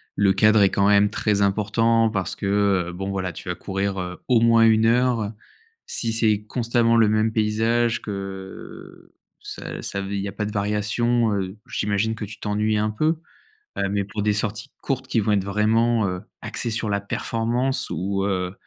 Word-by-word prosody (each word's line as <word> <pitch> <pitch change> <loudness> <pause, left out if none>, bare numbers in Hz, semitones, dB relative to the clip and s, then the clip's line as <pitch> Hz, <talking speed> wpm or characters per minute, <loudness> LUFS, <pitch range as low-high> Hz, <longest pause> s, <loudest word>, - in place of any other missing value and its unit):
le 100 -1 +3
cadre 110 0 +4
est 95 - +5
quand 100 0 +2
même 100 0 +5
très 105 -1 0
important 110 +3 +2
parce 95 -4 -3
que, - - -6 0.4
heu, - - -7
bon, 95 +2 -4
voilà, 95 -3 -3
tu 90 - -8
vas 90 - -1
courir, 95 0 -3
heu, 90 0 -5
au 125 -2 +4
moins 115 0 +5
1 110 0 +4
heure, 120 0 +3
heu. 105 +1 -3 0.5
Si 115 -2 -1
c'est 110 -2 +2
constamment 115 0 +1
le 110 -2 +5
même 110 +1 +1
paysage 115 +2 +1
que, 95 -2 -8 0.3
ça - - -7
ça 100 - -4
il 100 0 -3
y 100 - -3
a - - -7
pas 105 +2 -3
de 105 - -4
variation, 110 +2 +1
heu, 95 0 -3
j'imagine 105 +2 -1
que 110 - -7
tu 105 - -11
t'ennuies 105 +1 0
un 105 +1 +1
peu? 155 +9 0 0.6
Heu, 100 - 0
mais 100 0 0
pour 105 +2 -5
des 105 0 +2
sorties 110 +5 -2
courtes 130 -1 -2
qui 115 - +1
vont 105 - 0
être 100 -2 +2
vraiment, 110 +2 +2
heu, 90 0 -3 0.2
axées 115 +1 -4
sur 110 -1 -1
la 100 0 0
performance 120 +6 -1
ou, 95 +1 -2
heu 90 -2 -1
105 Hz, 195 wpm, -23 LUFS, 100-115 Hz, 0.6 s, est